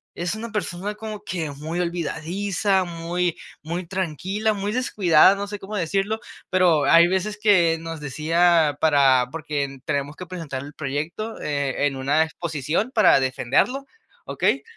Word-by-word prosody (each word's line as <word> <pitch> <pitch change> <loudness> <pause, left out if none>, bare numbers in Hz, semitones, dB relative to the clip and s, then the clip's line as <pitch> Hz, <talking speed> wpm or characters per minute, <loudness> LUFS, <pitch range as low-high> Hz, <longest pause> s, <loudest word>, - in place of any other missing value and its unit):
es 175 +2 -2
una 225 +1 -6
persona 205 0 -3
como 215 -1 -7
que 165 -5 -3
muy 155 +5 -5
olvidadiza, 180 +3 -1
muy, 170 0 -2 0.2
muy 170 +3 -4
tranquila, 190 +4 -1
muy 200 +1 -2
descuidada, 195 -7 +4
no 200 0 -4
sé, 205 0 -7
cómo 200 +3 -7
decirlo, 195 +4 -1 0.3
pero 175 -5 +3
hay 170 0 +7
veces 190 +3 -1
que 175 -6 +4
nos 165 -1 -6
decía 155 +2 +2
para 135 -5 +4
porque 145 -3 -3
tenemos 145 -1 -2
que 180 - -8
presentar 160 -7 -6
el 145 +1 -10
proyecto, 155 +10 -4
eh, 140 -1 -1
en 140 -1 0
una 140 +4 +2
exposición 160 - -2
para 215 - +5
defenderlo, 135 - 0 0.4
okey. - - 0
170 Hz, 145 wpm, -23 LUFS, 150-195 Hz, 0.4 s, hay